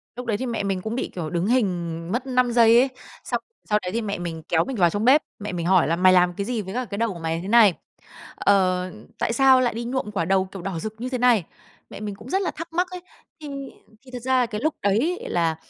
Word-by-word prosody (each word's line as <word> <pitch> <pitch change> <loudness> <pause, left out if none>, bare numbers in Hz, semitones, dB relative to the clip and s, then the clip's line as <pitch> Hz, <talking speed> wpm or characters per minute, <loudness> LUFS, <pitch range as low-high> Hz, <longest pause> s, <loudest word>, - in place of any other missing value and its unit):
Lúc 250 0 -6
đấy 215 -3 0
thì 260 - -3
mẹ 230 -4 -2
mình 195 -2 -1
cũng 220 +3 -4
bị, - - -2
kiểu, 160 -3 -4
đứng 175 +1 -1
hình 175 -8 -1
mất 250 +3 -2
5 250 -1 +2
giây 230 0 +6
ấy, 265 +1 +3 0.3
xong - - -2 0.3
sau 210 0 +3
đấy 180 - -4
thì 230 +2 -1
mẹ 205 -2 -3
mình 165 -2 -5
kéo 165 0 +2
mình 265 - -4
vào 175 -4 +4
trong 205 +6 -2
bếp, 280 +4 +6 0.2
mẹ 205 -1 -5
mình 170 -2 -3
hỏi 185 -3 +4
là: 165 - +1
"Mày 185 +1 +5
làm 180 -1 +4
cái 200 +2 -4
gì 235 -2 -2
với 190 +1 -7
cả 250 0 -2
cái 200 -1 -6
đầu 230 -3 0
của 170 - -9
mày 165 0 -2
thế 190 - -7
này?", 215 -4 +6 0.6
ờ, 185 -2 +2 0.3
"Tại 230 - 0
sao 265 0 +5
lại 240 -3 +1
đi 235 +1 -4
nhuộm 245 -4 -3
quả 170 -5 -1
đầu, 190 +1 +2
kiểu, 190 -1 -9
đỏ 185 -3 -4
rực 215 +4 -5
như 255 - -3
thế 255 - -2
này?" 240 -8 +3 0.4
Mẹ - - -9
mình 205 -2 -5
cũng 225 +5 -12
rất 385 +1 +1
là 370 - -1
thắc 330 +1 -9
mắc 360 +2 +1
ấy. 360 -1 -7 0.4
Thì 300 - -7 0.6
thì 255 - -14
thật 250 - -5
ra 260 +1 +2
là 245 - +3
cái 215 -1 -5
lúc 310 0 0
đấy 235 - +1
là, 165 -2 +1
210 Hz, 275 wpm, -23 LUFS, 180-250 Hz, 0.6 s, giây